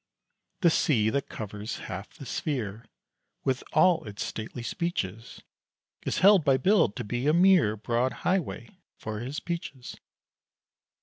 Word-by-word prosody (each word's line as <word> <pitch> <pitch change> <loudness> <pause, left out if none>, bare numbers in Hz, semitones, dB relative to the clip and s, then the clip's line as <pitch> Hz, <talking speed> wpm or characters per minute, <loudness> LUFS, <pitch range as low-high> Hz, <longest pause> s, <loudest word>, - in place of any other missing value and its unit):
The 170 -3 +5
sea 110 -9 +2
that 140 +2 -2
covers 105 +1 -6
half 95 +3 -6
the 140 - -10
sphere, 115 -6 -3 0.6
With 130 -1 0
all 165 +1 +4
its 105 -1 -5
stately 115 +2 -6
speeches, 115 - -4 0.6
Is - - 0
held 200 -4 +7
by 135 -3 +4
Bill 185 - +4
to 100 - -6
be 120 +6 -2
a 150 - +4
mere 175 - +5
Broad 120 +4 0
highway 185 -1 -1 0.3
for 110 -1 -5
his 135 +7 -4
peaches. 170 -8 -6
130 Hz, 135 wpm, -28 LUFS, 110-165 Hz, 0.6 s, held